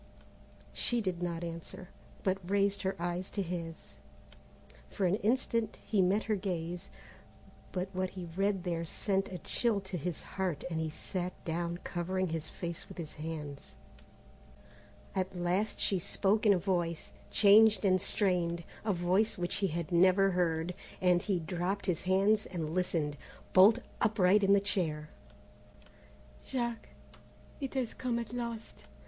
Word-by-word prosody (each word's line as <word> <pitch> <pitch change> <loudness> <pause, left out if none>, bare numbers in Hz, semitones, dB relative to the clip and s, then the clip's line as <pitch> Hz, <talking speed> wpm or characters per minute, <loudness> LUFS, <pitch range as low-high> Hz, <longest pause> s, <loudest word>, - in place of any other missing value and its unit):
She 240 - +1
did 185 -5 -2
not 170 -1 -2
answer, 170 +2 -7 0.3
but 190 0 +1
raised 200 0 +2
her 190 0 -1
eyes 175 +2 -2
to 200 - -2
his. 165 -2 -6 1.0
For 195 - -1
an 180 +3 +3
instant 230 0 0
he 205 -3 +2
met 195 +4 +3
her 215 - +1
gaze, 180 -2 -3 0.8
but 185 0 -2
what 185 0 -1
he 180 -2 -7
read 195 -1 +1
there 170 -2 -1
sent 195 +4 -1
a 180 - -4
chill 220 +5 0
to 190 -1 -5
his 170 +1 -3
heart 185 -6 -3
and 160 - -1
he 160 - -1
sat 180 +3 -4
down 170 +1 -2
covering 185 +1 -1
his 160 -1 -3
face 170 -2 -5
with 190 - -10
his 160 -3 -5
hands. 150 -2 -7 1.4
At 190 0 -2
last 180 +5 0
she 195 - +1
spoke 210 +5 +1
in 205 - +8
a - - +3
voice, 175 -3 -1 0.2
changed 210 0 +6
and 185 -1 +4
strained, 175 -4 +1 0.2
a 215 -2 +1
voice 185 +5 +2
which 175 -1 -1
he 200 -1 +1
had 170 +1 -3
never 185 +3 +5
heard, 170 -1 0 0.3
and 180 -1 +4
he 195 -3 0
dropped 180 +4 -2
his 180 -5 0
hands 195 +3 +3
and 165 -4 -4
listened, 165 -5 0 0.4
bolt 200 +5 +8 0.2
upright 205 -2 +4
in 195 +1 +6
his 200 - +2
chair. 155 -6 -1 1.3
"Jack, 235 -3 -3 0.7
it 275 -2 -4
has 255 -4 -1
come 245 -2 -1
at 235 -1 -4
last. 235 -2 -5
185 Hz, 150 wpm, -32 LUFS, 170-200 Hz, 1.4 s, in